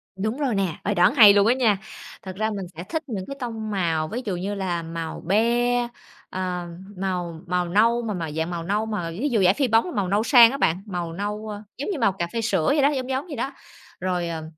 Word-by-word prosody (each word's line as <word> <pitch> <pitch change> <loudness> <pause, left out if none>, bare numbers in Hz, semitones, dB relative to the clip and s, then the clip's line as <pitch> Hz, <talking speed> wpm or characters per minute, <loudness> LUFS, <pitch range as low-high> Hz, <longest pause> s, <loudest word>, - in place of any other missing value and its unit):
Đúng 215 +6 -2
rồi 275 -6 0
nè, 190 -5 0
ờ, - - 0
đoán 180 +6 +4
hay 215 -6 +9
luôn 200 +1 +4
á 240 - +5
nha. 230 -6 +2 0.5
Thật 190 -2 -7
ra 220 +2 0
mình 200 -3 -4
sẽ 170 - -5
thích 320 - -4
những 200 -7 -4
cái 275 - -6
tông 225 -3 -4
màu, 165 -5 0
ví 240 +10 -4
dụ 195 -4 -2
như 195 +4 -3
là 180 -4 -2
màu 165 0 -5
be, 235 +6 +2 0.5
ờ, 180 -1 -3 0.3
màu 180 -4 -3
màu 180 0 0
nâu, 230 +6 +3
mà 225 -3 -3
màu 165 -4 -4
dạng 160 +2 -2
màu 170 -1 -4
nâu 205 +5 0
mà 210 -6 -3
ví 230 - -2
dụ 225 -6 +2
vải 180 - +6
phi 270 +1 +1
bóng 225 +8 +2
màu 200 -3 0
nâu 205 +4 +1
sang 235 -2 +7
á 275 - -3
bạn, 180 -8 +1
màu 175 -4 -4
nâu, 210 +4 -4
a, 210 0 -7
giống 285 - -4
như 345 - -3
màu 225 -5 +3
cà 175 -3 -3
phê 230 - -1
sữa 195 -8 0
vậy 290 - +3
đó, 280 - +5
giống, 260 -3 -3
giống 265 +2 -1
vậy 295 - -6
đó. 265 +4 -3 0.5
Rồi, 180 -1 -1
ờm, 160 -1 -4
205 Hz, 250 wpm, -24 LUFS, 180-235 Hz, 0.5 s, hay